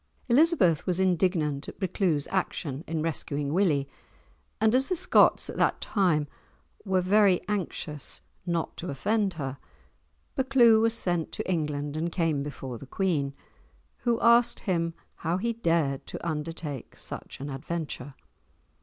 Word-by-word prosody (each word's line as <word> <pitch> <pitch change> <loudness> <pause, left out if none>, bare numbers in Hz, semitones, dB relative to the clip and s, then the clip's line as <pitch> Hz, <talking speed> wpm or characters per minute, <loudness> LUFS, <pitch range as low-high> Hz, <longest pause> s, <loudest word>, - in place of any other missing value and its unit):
Elizabeth 240 - +4
was 180 0 +1
indignant 175 -6 +1
at - - -12
Buccleuch's 180 -6 +1
action 160 -6 -2
in 160 -1 -2
rescuing 145 -3 -2
Willie, 160 -7 +2 0.7
and 220 +1 +3
as 265 +1 +3
the 365 - +1
Scots - - +4
at - - -6
that - - +2
time 170 -7 +1 0.6
were 190 -3 +1
very 195 0 +4
anxious 170 -7 -3 0.2
not 170 -2 -2
to 175 - -5
offend 200 +8 0
her, 135 -4 -5 0.8
Buccleuch 250 -4 +5
was 230 0 +3
sent 175 -6 -1
to - - -4
England 150 -4 -1
and 165 +2 -1
came 165 -5 0
before 135 -4 -6
the 135 - -11
Queen, 145 -6 -1 0.6
who 235 -2 0
asked 235 +1 +4
him 170 -4 -1 0.2
how 170 +2 -1
he 235 +4 -1
dared 165 - 0
to - - -6
undertake 150 -3 -5
such - - -7
an 140 +1 -5
adventure. 140 -1 -5
170 Hz, 140 wpm, -28 LUFS, 150-200 Hz, 0.8 s, Buccleuch